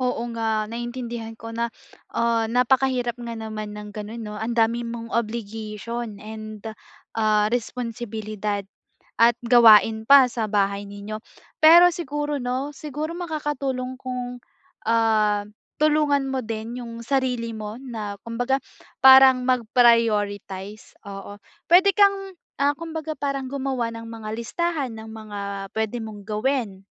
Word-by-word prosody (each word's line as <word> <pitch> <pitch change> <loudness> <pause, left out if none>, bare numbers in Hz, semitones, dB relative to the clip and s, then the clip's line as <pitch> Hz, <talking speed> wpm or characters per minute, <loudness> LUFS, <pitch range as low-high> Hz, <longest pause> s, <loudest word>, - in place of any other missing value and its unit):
Oo 250 -2 0
nga. 220 -2 0
Naintindihan 235 0 -5
ko 230 0 -8
na, 235 +1 -1 0.4
ah, 230 -1 +1
napakahirap 250 0 +1
nga 235 -1 -5
naman 215 -1 -6
ng 210 0 -8
gano'n 215 +2 -7
'no? 210 - -6
Ang 230 +2 -2
dami 230 +1 +2
mong 230 0 -7
obligation 225 0 -4
and, 215 0 -8 0.5
ah, 215 -1 +2
responsibilidad 220 -4 -3 0.6
at 235 +1 +6
gawain 220 -2 +6
pa 275 -2 +9
sa 230 -2 -2
bahay 200 -1 0
ninyo. 205 +2 -7 0.4
Pero 340 +3 +9
siguro 295 -3 -3
'no, 255 +3 -2
siguro 300 +3 -5
makakatulong 285 -6 -3
kung, 250 -1 -5 0.5
ah, 215 -2 +3 0.4
tulungan 300 -2 +3
mo 265 0 -1
din 225 +2 -5
'yung 230 -1 -8
sarili 250 -4 0
mo 215 0 -6
na 220 -6 -6
kumbaga 245 +3 0 0.5
parang 265 -1 +8
mag-prioritize, 215 -5 +1
oo. 200 +1 -8 0.3
Puwede 370 +4 +7
kang, 395 -2 +3 0.3
ah, 285 - +4
kumbaga 320 -1 -5
parang 275 -2 -2
gumawa 265 -4 -2
ng 230 0 -8
mga 225 -1 -8
listahan 290 +4 -2
ng 220 0 -9
mga 215 -2 -8 0.4
puwede 220 +2 -1
mong 215 -2 -8
gawin. 215 -2 -1
235 Hz, 125 wpm, -24 LUFS, 215-265 Hz, 0.6 s, pa